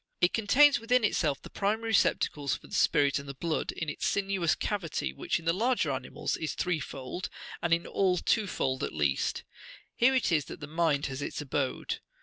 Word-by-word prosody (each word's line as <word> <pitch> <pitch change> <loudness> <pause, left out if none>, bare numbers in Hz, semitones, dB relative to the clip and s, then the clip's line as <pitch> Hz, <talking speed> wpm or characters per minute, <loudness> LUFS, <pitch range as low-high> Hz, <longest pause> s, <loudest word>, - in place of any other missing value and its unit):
It 175 - +3
contains 275 +7 +5
within 245 +1 +2
itself 155 -9 +1
the - - -11
primary 220 +3 -1
receptacles 145 -9 +2
for - - -18
the - - -13
spirit 140 0 +3
and 140 0 -9
the 140 - -6
blood, 165 +3 -2
in 165 - -5
its 150 - -2
sinuous 195 -4 +1
cavity, 170 - -2
which - - -1
in 170 - -10
the 165 - +3
larger 225 - +1
animals 130 -1 -3
is 155 -3 -3
threefold,67 155 -1 -3 0.3
and 170 - -1
in 170 +1 +2
all 185 -2 +1
twofold 180 - 0
at - - -3
least: 70 -3 0 0.5
here 260 +3 +4
it 255 - +2
is 150 -4 +2
that - - -9
the 150 - -7
mind68 155 -2 +1
has 135 0 -4
its - - -4
abode. 140 -2 -2
165 Hz, 190 wpm, -29 LUFS, 140-200 Hz, 0.5 s, contains